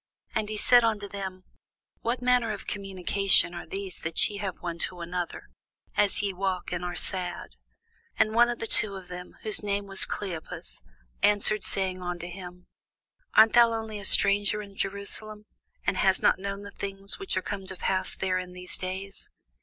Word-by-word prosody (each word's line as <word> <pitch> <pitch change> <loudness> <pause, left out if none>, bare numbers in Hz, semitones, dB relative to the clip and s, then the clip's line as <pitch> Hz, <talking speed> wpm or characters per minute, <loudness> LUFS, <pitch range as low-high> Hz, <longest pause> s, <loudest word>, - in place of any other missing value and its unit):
And 215 -1 -1
he 215 - -3
said 245 +3 +5
unto 215 -3 0
them, 190 -2 -6 0.6
What 245 +2 -2
manner 250 -2 +3
of 210 -2 -5
communications 195 -2 +1
are 170 - -7
these 195 +1 -5
that 160 0 +2
ye 205 - -7
have 195 -3 -4
one 170 -1 -5
to 180 -1 -1
another, 175 0 -5 0.5
as 205 0 +5
ye 200 -1 -1
walk, 185 -1 -2
and 180 0 -3
are 175 0 -3
sad? 180 -2 -2 0.6
And 215 - +4
the - - -7
one 240 +1 +5
of 210 -5 +3
them, 180 0 -8
whose 215 -1 +3
name 205 -1 -1
was 195 -1 -3
Cleopas, 175 - -6 0.4
answering 210 0 +3
said 190 -2 -1
unto 175 -1 -4
him, 180 0 -9 0.7
Art 220 0 +7
thou 235 -1 +7
only 220 -2 -4
a 200 - -3
stranger 200 +2 +5
in 200 -1 -13
Jerusalem, 205 +2 -4 0.4
and 190 - +1
hast 190 0 +3
not - - +4
known 200 +1 -5
the 200 - -8
things 195 - -6
which 390 - -1
are 185 - -1
come 195 -2 -5
to 190 - -6
pass 185 +1 0
there 185 -1 0
in 180 0 -7
these 180 0 0
days? 190 +2 -6
195 Hz, 175 wpm, -27 LUFS, 185-210 Hz, 0.7 s, Art